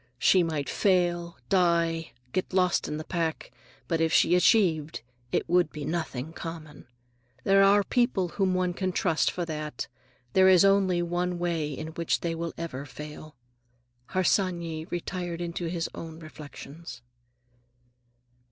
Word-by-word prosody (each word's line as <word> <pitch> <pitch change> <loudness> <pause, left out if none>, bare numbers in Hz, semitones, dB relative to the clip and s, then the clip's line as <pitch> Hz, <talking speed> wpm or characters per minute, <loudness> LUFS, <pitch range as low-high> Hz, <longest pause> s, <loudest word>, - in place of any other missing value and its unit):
She 185 +8 +5
might 155 -4 -1
fail, 175 -3 +1
die, 170 -3 +2 0.2
get 185 - -2
lost 180 -2 +2
in 150 - -3
the 155 - -5
pack. 165 -2 -3 0.4
But 165 -1 0
if 165 0 +2
she 170 - +4
achieved, 180 - +3 0.3
it - - 0
would 175 -2 +3
be 150 -2 -6
nothing 160 -2 -3
common. 160 -5 -8 0.6
There 195 0 +5
are 200 +1 +6
people 195 -5 +1
whom 190 0 0
one 180 -1 +1
can 185 0 -2
trust 165 -4 +2
for 175 - -3
that. 150 -4 -5 0.5
There 190 0 +6
is 185 0 +7
one 180 -2 +2
way 170 -4 -1
in 155 +3 -5
which 165 0 -1
they 170 -1 -1
will 165 0 -3
never 160 -5 -5
fail." 150 +2 -10 0.7
Harsanyi 170 -4 0
retired 175 0 -4
into 170 0 -3
his 165 0 -2
own 160 -1 -8
reflections. 155 -2 -10
170 Hz, 140 wpm, -27 LUFS, 160-180 Hz, 0.7 s, is